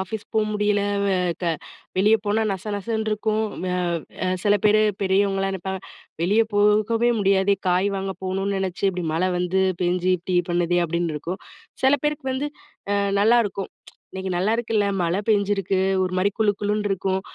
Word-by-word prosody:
Office 200 +3 -5
போ - - +2
முடியல. 210 -1 +1 0.2
வெ 195 -1 +2 0.3
க - - -1 0.5
வெளிய 210 +4 +5
போனா 210 +2 +1
நச 190 -2 -6
நசன்னு 220 +2 -2
இருக்கும்." 215 +1 0 0.2
வ 185 - -2 0.6
அ - - +1 0.2
சில 205 0 +4
பேரு 215 +1 +5 0.2
பெரியவங்கல்லாம் 195 0 +1
நெனைப்பாங்க, 190 +1 -5 0.4
"வெளிய 200 +6 +3
போகவே 215 +3 +3
முடியாதே. 195 0 +3
காய் 180 +3 +2
வாங்க 195 0 -3
போகணும்னு 195 +1 -1
நெனச்சு 190 -1 -3
இப்படி 180 -2 -4
மழை 180 +3 +1
வந்து 180 +2 +1 0.2
பேஞ்சு, 180 +1 +1
இப்படி 180 +1 -1
பண்ணுதே." 175 0 +1
அப்படின்னு 170 0 -1
இருக்கும். 170 +6 -5 0.4
சில 265 +2 +5
பேருக்கு 295 -1 -1
வந்து 285 +3 -2 0.4
அ - - +2 0.2
நல்லாருக்கும். 210 -2 +2 0.4
"இன்னைக்கு 190 0 -4
நல்லாயிருக்குல்ல! 220 +2 +1 0.2
மழை 175 +4 0
பெஞ்சிருக்கு. 200 -2 +1 0.2
ஒரு 185 0 -2
மாரி 200 +2 +2
குளு 210 -2 +3
குளுன்னு 210 0 0
இருக்கும். 190 0 -1
195 Hz, 155 wpm, -23 LUFS, 185-210 Hz, 0.6 s, வெளிய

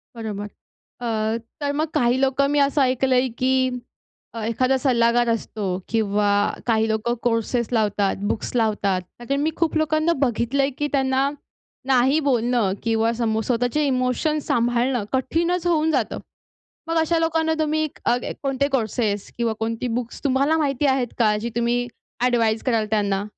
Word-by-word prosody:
बरोबर. 210 -3 -5 0.5
अ, 225 -1 -1 0.2
तर 285 - 0
मग 310 +1 +1
काही 245 +1 +2
लोकं 270 +1 +2
मी 290 - +2
असं 280 +1 +3
ऐकलंय 260 0 +2
की 260 +1 +3 0.8
अ, 225 - -4
एखादा 255 +4 +1
सल्लागार 240 -2 +3
असतो 220 -2 -2 0.2
किंवा 210 -2 +1 0.4
काही 225 -1 +2
लोकं 220 +2 0
कोर्सेस 235 0 0
लावतात, 205 -3 +1 0.2
बुक्स - - -4
लावतात, 205 -5 +1 0.3
त्या 275 0 0
मी 305 +3 0
खूप 330 -2 0
लोकांना 315 +1 +2
बघितलंय 270 +2 +1
की 295 - 0
त्यांना 265 0 +2 0.6
नाही 265 +3 +4
बोलणं 240 -5 +2
किंवा 225 0 +1
समोर 225 -1 -1
स्वतःचे 245 +5 0
इमोशन्स 260 +4 0
सांभाळणं 240 0 +1
कठीणच 335 +7 0
होऊन 320 -2 +2
जातं. 260 -8 -1 0.7
मग 330 - 0
अशा 325 +1 +1
लोकांना 325 0 +1
तुम्ही 310 0 +1 0.2
अ, 240 - +3 0.3
कोणते 275 0 0
कोर्सेस 215 -3 -2
किंवा 235 -2 0
कोणती 230 +2 -2
बुक्स 240 -1 -8
तुम्हाला 280 +3 +2
माहिती 290 -2 0
आहेत 250 -3 -2
का 215 -2 +4
जी 235 +3 -3
तुम्ही 240 +1 0 0.4
ॲडवाइज 230 -3 +2
कराल 230 -4 +1
त्यांना? 200 -2 +1
245 Hz, 145 wpm, -22 LUFS, 225-280 Hz, 0.8 s, नाही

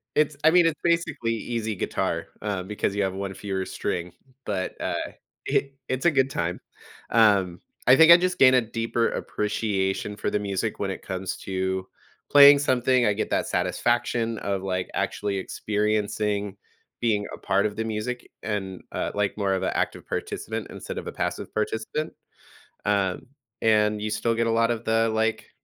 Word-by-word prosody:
It's 150 -1 +2
I 160 - +7
mean, 175 0 +6
it's 165 -2 +1
basically 170 -9 +1
easy 110 -1 -3
guitar, - - -2
uh, 100 -3 -2
because 100 0 -2
you 100 - +1
have 95 - -1
one 95 0 -4
fewer 95 -1 -3
string, 85 0 -3 0.3
but, 95 -3 -3
uh, - - -2 0.3
it 140 0 0
it's 130 +3 -2
a 170 - +6
good 135 -2 +2
time. 85 -7 -2 0.5
Um, 100 -6 +3 0.3
I 130 - +9
think 160 +3 +8
I 170 - +11
just 180 0 -1
gain 130 -1 +7
a 130 - +5
deeper 115 +1 -1
appreciation 105 -1 -2
for - - -2
the 105 - +1
music 100 +2 -2
when 100 - -1
it 95 - -6
comes 95 -1 -4
to 95 0 -2 0.4
playing 145 0 +9
something- 130 -2 +2
I 105 - +3
get - - -2
that - - +1
satisfaction 115 +5 0
of, 100 -1 -2
like, 90 -1 -2
actually 100 -1 -1
experiencing 105 0 -1 0.4
being 105 -3 +1
a - - -6
part 100 +2 +1
of 105 - -7
the 110 - -2
music 110 +3 -4
and, 95 -3 -3
uh, - - -2
like, 105 0 -1
more 100 -2 +1
of 95 - -1
a - - -1
active - - -2
participant - - -4
instead - - -7
of - - -5
a - - -3
passive - - -4
participant. 110 +8 -2 0.7
Um, 100 0 0 0.3
and 105 -1 +3
you 110 - -2
still 115 +2 0
get 115 0 +1
a - - +2
lot 115 +1 +2
of 115 0 -5
the, 115 0 +2
like, 110 0 0
105 Hz, 180 wpm, -25 LUFS, 100-120 Hz, 0.7 s, I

